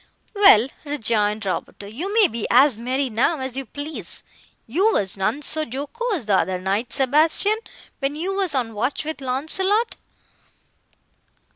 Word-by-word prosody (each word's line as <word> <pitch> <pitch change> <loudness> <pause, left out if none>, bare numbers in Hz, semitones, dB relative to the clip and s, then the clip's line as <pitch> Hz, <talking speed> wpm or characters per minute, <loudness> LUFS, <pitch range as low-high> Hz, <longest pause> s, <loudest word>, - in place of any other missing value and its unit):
"Well," 390 - +6 0.2
rejoined 220 -7 -1
Roberto, 195 +1 -5
"you 280 - -6
may 430 -2 +5
be 230 -7 -4
as 260 +1 +5
merry 255 +4 -2
now, 255 +7 0
as 260 -1 -5
you 270 -1 -5
please; 285 - -7 0.4
you 370 - +1
were 205 - +1
none 205 +9 -2
so 315 - +5
jocose 310 - -4
the 200 -2 +2
other 185 -1 -2
night, 195 +6 -2
Sebastian, 310 - +3 0.4
when 275 +1 -2
you 360 +5 -3
were 390 -1 0
on 235 -4 -2
watch 250 +8 -2
with 315 -2 -5
Launcelot." 375 - +1
270 Hz, 145 wpm, -22 LUFS, 225-325 Hz, 0.4 s, Well